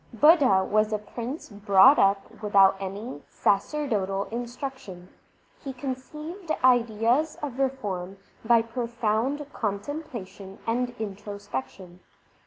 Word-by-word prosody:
Budha 275 - +5
was 215 +1 +2
a 215 - +1
prince 235 +7 -7
brought 205 +5 +5
up 195 +2 +1
without 195 -2 +5
any 195 - -6
sacerdotal 200 -4 0
instruction. 240 -6 -6 0.5
He 270 - -5
conceived 300 +7 -7
ideas 245 +4 +3
of 270 -3 -4
reform 200 -9 -2 0.3
by 230 0 +4
profound 235 +3 -1
contemplation 205 -4 -5
and 245 +1 -1
introspection. 200 -5 -7
225 Hz, 95 wpm, -26 LUFS, 195-260 Hz, 0.5 s, Budha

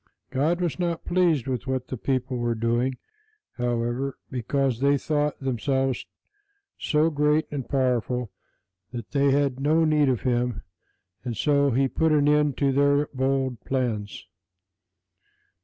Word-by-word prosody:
God 155 +7 +1
was 175 0 -2
not 170 -2 -2
pleased 175 -7 +2
with 130 -2 -3
what 130 -1 -2
the - - -3
people 130 +1 -2
were 120 -1 -1
doing, 120 +3 0 0.6
however, 120 +2 -1
because 130 0 -1
they 140 +1 +3
thought 150 0 -1
themselves 135 0 -1 0.7
so 155 +2 +2
great 150 +1 +2
and 140 -4 -5
powerful 125 -3 0 0.6
that 120 -3 -7
they 140 -1 +3
had 135 -1 +1
no 155 +4 +3
need 150 -3 +3
of 125 -4 0
Him, 125 -2 -1 0.6
and 120 -3 -4
so 140 +1 +3
He 135 +2 +2
put 160 +4 +1
an 145 -1 +3
end 150 -2 +3
to 140 -1 +2
their 140 +2 +2
bold 130 -2 0
plans. 115 -5 -3
135 Hz, 140 wpm, -25 LUFS, 125-145 Hz, 0.7 s, they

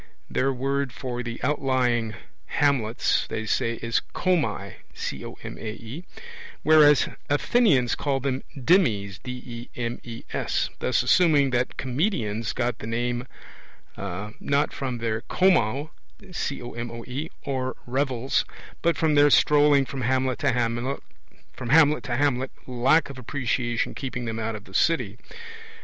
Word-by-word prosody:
Their 135 +1 +2
word 135 +1 -1
for 125 +1 -4
the 115 -1 -5
outlying 125 -5 +1 0.3
hamlets, 125 -6 +1
they 110 - -4
say, 115 +1 +1
is 115 0 +1
comae, 180 -4 0 1.9
whereas 150 -2 +6 0.2
Athenians 145 - +3
call 140 -2 0
them 135 0 -1 0.2
demes 120 - +2
thus 120 -1 -5 0.5
assuming 145 -1 +4
that 125 0 0
comedians 120 - -1
got 120 -2 -1
the 110 - -6
name 120 +2 -1 0.7
not 105 +9 -2
from 130 -3 -3
their 115 -1 -2
comoe 155 - +2 1.5
or 130 -2 -2
revels, 130 0 0 0.4
but 170 0 +2
from 160 -2 +2
their 145 0 +6
strolling 145 -1 +5
from 135 0 -5
hamlet 130 +1 +1
to 145 -3 +2
hamlet, 120 +2 -1 1.6
lack 130 +6 +3
of 130 - -10
appreciation 120 -2 -1
keeping 125 -3 -4
them 115 -1 -3
out 110 0 -2
of 105 - -8
the 95 - -16
city. 120 -6 +1
130 Hz, 105 wpm, -25 LUFS, 115-140 Hz, 1.9 s, whereas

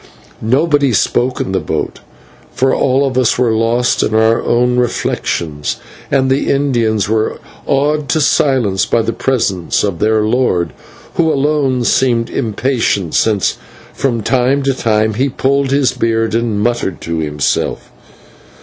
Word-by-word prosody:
Nobody 140 +2 +2
spoke 125 +4 +1
in - - -2
the 95 - 0
boat, - - -4 0.5
for 130 +1 +1
all 135 +1 +2
of 130 -1 0
us 125 -1 +2
were 120 -2 +2
lost 115 +2 +1
in 110 - 0
our 110 +1 +3
own 125 +1 +1
reflections, 80 -10 -2 0.3
and 135 -1 +2
the 135 - 0
Indians 120 -7 +1
were 110 0 -1 0.3
awed 145 +1 0
to 160 - +2
silence 130 - +2
by 115 - +1
the 115 - -2
presence 110 -8 -1
of 100 -5 -2
their 110 0 +2
lord, 105 - 0 0.4
who 160 -2 +3
alone 140 -3 +1
seemed 120 -2 +1
impatient, 115 - -1
since 105 -4 +1 0.3
from 120 -5 -1
time 130 +4 +1
to 135 0 +1
time 110 -3 0
he 130 +6 0
pulled 140 +1 0
his 140 -1 +2
beard 115 -1 -1
and 115 -2 0
muttered 120 -5 -1
to 80 -1 -3
himself. 75 -3 -2
120 Hz, 145 wpm, -15 LUFS, 110-135 Hz, 0.5 s, our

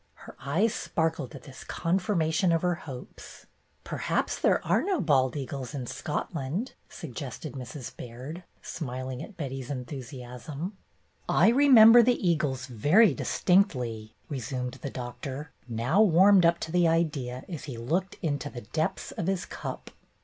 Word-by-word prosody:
'' - - -41
Her - - -11
eyes 175 - +1
sparkled 160 -5 -2
at - - -10
this 130 -2 -11
confirmation 175 -1 +1
of 165 0 +1
her 180 0 +2
hopes. 130 -7 -10 0.4
"Perhaps - - -1
there - - +3
are - - +3
no 380 -4 0
bald 130 -6 +2
eagles 135 0 -5
in 130 -3 -4
Scot 130 +7 -4
land," 160 - -3 0.2
suggested 155 -7 -7
Mrs. 130 0 -7
Baird, 130 +9 -8 0.2
smiling 130 -4 -5
at 210 - -10
Betty's 135 -4 -5
enthusiasm. 130 - -6 0.5
"I - - +5
remember 240 -3 +8
the 235 -5 +2
eagles 145 -6 0
very 150 - +4
distinctly," 125 - +1
resumed 130 -1 -4
the 140 - -4
Doctor, 135 +3 -6 0.2
now 120 - +2
warmed 190 -1 +6
up 170 0 +3
to 160 - -4
the 175 0 +4
idea, 145 -7 0
as 165 -6 -6
he 130 -5 -6
looked 170 +11 -1
into 145 -2 -1
the 120 - -8
depths 155 +9 -2
of 170 - -4
his 190 -2 0
cup. - - -7
150 Hz, 150 wpm, -28 LUFS, 130-180 Hz, 0.5 s, remember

